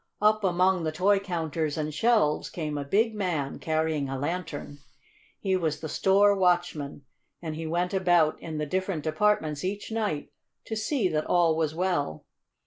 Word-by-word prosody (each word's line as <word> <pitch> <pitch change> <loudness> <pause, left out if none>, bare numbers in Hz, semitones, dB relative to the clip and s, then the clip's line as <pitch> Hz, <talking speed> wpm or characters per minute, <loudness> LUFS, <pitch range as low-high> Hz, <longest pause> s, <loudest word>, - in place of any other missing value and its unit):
Up 215 0 +3
among 185 0 +2
the 155 - -1
toy 195 +5 +3
counters 165 -5 -2
and 155 -1 -2
shelves 215 -4 +2
came 155 -3 -4
a 145 - -2
big 220 +10 +2
man 175 -9 -2
carrying 155 -3 -1
a 135 - -3
lantern. 145 -1 -4 0.6
He 190 -2 0
was 160 -4 -1
the 160 - -6
store 200 +4 +4
watchman, 175 -7 0 0.4
and 160 -2 -5
he 160 0 -5
went 175 +3 -1
about 175 -5 +3
in 160 -2 -5
the 150 - -1
different 185 0 -2
departments 155 -3 +1
each 200 +4 -4
night 210 -10 -2 0.3
to 220 - -4
see 220 0 0
that 155 -2 -1
all 170 -2 +3
was 155 -1 -1
well. 175 - -1
170 Hz, 165 wpm, -27 LUFS, 155-190 Hz, 0.6 s, store